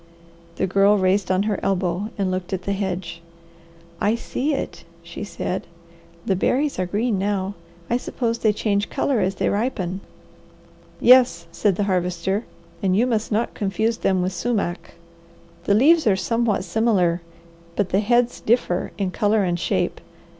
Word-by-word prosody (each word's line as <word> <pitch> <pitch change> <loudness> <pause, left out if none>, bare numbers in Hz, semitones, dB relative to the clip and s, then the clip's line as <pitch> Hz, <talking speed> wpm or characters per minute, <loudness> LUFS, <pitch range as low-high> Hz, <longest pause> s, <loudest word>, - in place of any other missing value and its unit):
The 190 - 0
Girl 200 +2 +4
raised 190 0 +1
on 185 +1 +2
her 210 -2 -1
elbow 190 +1 -1
and 195 -2 0
looked 185 0 -3
at 185 -1 -3
the 200 - -1
hedge. 180 -4 -4 0.8
"I 210 +3 +2
see 260 +5 -2
it," - - -5 0.2
she 170 +4 -7
said. 190 -2 -4 0.6
"The 195 - +1
berries 270 +7 0
are 185 - 0
green 210 +2 0
now. 195 0 -1 0.3
I 240 - +1
suppose 235 -2 -2
they 215 - +3
change 205 -1 -1
colour 265 -5 0
as 190 -1 0
they - - 0
ripen." 195 -4 -1 1.0
"Yes," 250 -8 +5
said 195 +2 +1
the 205 - 0
Harvester. 185 +2 -1 0.4
"And 190 -2 +2
you 235 - +4
must 225 -3 -1
not 220 +3 0
confuse 220 +3 -1
them 185 -2 +1
with 185 +1 -2
sumac. 195 -2 -2 0.7
The 200 - +3
leaves 310 +6 +5
are 200 - +5
somewhat 230 -1 0
similar, 190 -6 +1 0.5
but 200 -1 0
the 190 - +2
heads 240 +3 +2
differ 215 -6 +1
in 195 -2 -1
colour 210 +2 +2
and 175 -2 -1
shape. - - -1
200 Hz, 160 wpm, -22 LUFS, 185-225 Hz, 1.0 s, Yes